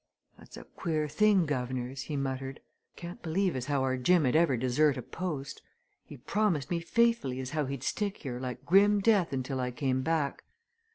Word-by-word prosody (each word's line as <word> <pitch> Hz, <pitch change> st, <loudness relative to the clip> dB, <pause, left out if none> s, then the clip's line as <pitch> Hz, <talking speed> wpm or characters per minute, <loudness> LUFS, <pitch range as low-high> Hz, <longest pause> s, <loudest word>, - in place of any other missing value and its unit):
"That's -, -, -13 dB
a -, -, -9 dB
queer 155 Hz, -4 st, -2 dB
thing, 200 Hz, +2 st, +3 dB
guv'nors!" 130 Hz, -2 st, -3 dB
he 150 Hz, -, -3 dB
muttered. 135 Hz, 0 st, -3 dB, 0.4 s
"Can't 175 Hz, 0 st, -8 dB
believe 180 Hz, +2 st, 0 dB
as 130 Hz, 0 st, -4 dB
how 140 Hz, -2 st, +1 dB
our 130 Hz, -1 st, 0 dB
Jim 160 Hz, +5 st, +3 dB
'ud 125 Hz, -, +1 dB
ever 160 Hz, -6 st, +4 dB
desert 130 Hz, +4 st, +2 dB
a 125 Hz, -, -5 dB
post. 150 Hz, -5 st, -5 dB, 0.4 s
He 145 Hz, -, -11 dB
promised 175 Hz, -, 0 dB
me 170 Hz, -, +1 dB
faithfully 230 Hz, -, +1 dB
as 130 Hz, -1 st, -5 dB
how 150 Hz, -3 st, -1 dB
he'd 135 Hz, -1 st, -5 dB
stick 205 Hz, +6 st, -2 dB
here 125 Hz, -3 st, -6 dB
like 125 Hz, 0 st, -6 dB
grim 200 Hz, +4 st, +5 dB
death 200 Hz, -5 st, +3 dB
until 130 Hz, 0 st, -3 dB
I 125 Hz, 0 st, -1 dB
came 130 Hz, +1 st, -1 dB
back. 155 Hz, -1 st, -1 dB
145 Hz, 185 wpm, -30 LUFS, 130-175 Hz, 0.4 s, grim